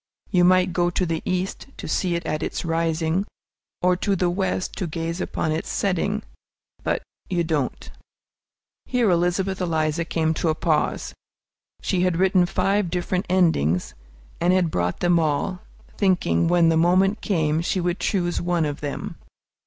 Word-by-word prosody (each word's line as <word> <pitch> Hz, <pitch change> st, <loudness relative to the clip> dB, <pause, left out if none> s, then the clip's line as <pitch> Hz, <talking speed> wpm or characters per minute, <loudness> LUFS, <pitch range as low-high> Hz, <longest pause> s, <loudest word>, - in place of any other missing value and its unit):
You 180 Hz, -2 st, +4 dB
might 185 Hz, 0 st, +4 dB
go 175 Hz, 0 st, +2 dB
to 180 Hz, +1 st, 0 dB
the 165 Hz, -1 st, -2 dB
East 185 Hz, +6 st, -2 dB
to -, -, -7 dB
see 180 Hz, -2 st, 0 dB
it 170 Hz, -, -3 dB
at 155 Hz, 0 st, -2 dB
its -, -, -3 dB
rising, 165 Hz, +2 st, 0 dB, 0.6 s
or 180 Hz, 0 st, +4 dB
to 200 Hz, +1 st, 0 dB
the 180 Hz, -1 st, +1 dB
West 185 Hz, 0 st, -2 dB
to 185 Hz, -, -2 dB
gaze 165 Hz, +2 st, -3 dB
upon 155 Hz, -, -2 dB
its 155 Hz, -, -2 dB
setting, 200 Hz, +2 st, 0 dB, 0.6 s
but -, -, -1 dB, 0.3 s
you 175 Hz, -2 st, +1 dB
don't. 155 Hz, -5 st, -2 dB, 1.0 s
Here 240 Hz, -6 st, +2 dB
Elizabeth 180 Hz, +2 st, +1 dB
Eliza 160 Hz, -1 st, 0 dB
came 160 Hz, -1 st, 0 dB
to 160 Hz, -, 0 dB
a 155 Hz, -, +1 dB
pause. 160 Hz, -2 st, 0 dB, 0.7 s
She 185 Hz, -2 st, 0 dB
had 180 Hz, -2 st, +1 dB
written 185 Hz, -1 st, +3 dB
five 195 Hz, 0 st, +1 dB
different 180 Hz, +1 st, -2 dB
endings, 160 Hz, -, +2 dB, 0.5 s
and 175 Hz, +1 st, +3 dB
had 180 Hz, -3 st, +2 dB
brought 90 Hz, 0 st, -1 dB
them 175 Hz, -1 st, +4 dB
all, 160 Hz, +4 st, -1 dB, 0.4 s
thinking, 175 Hz, -, +2 dB
when 170 Hz, -1 st, +4 dB
the 165 Hz, -, +3 dB
moment 185 Hz, +5 st, +3 dB
came, 160 Hz, -5 st, +1 dB
she 185 Hz, +2 st, -1 dB
would 175 Hz, 0 st, -1 dB
choose 175 Hz, -3 st, 0 dB
one 175 Hz, -2 st, +1 dB
of 145 Hz, -1 st, -4 dB
them. 145 Hz, -2 st, -5 dB
175 Hz, 160 wpm, -23 LUFS, 160-185 Hz, 1.0 s, You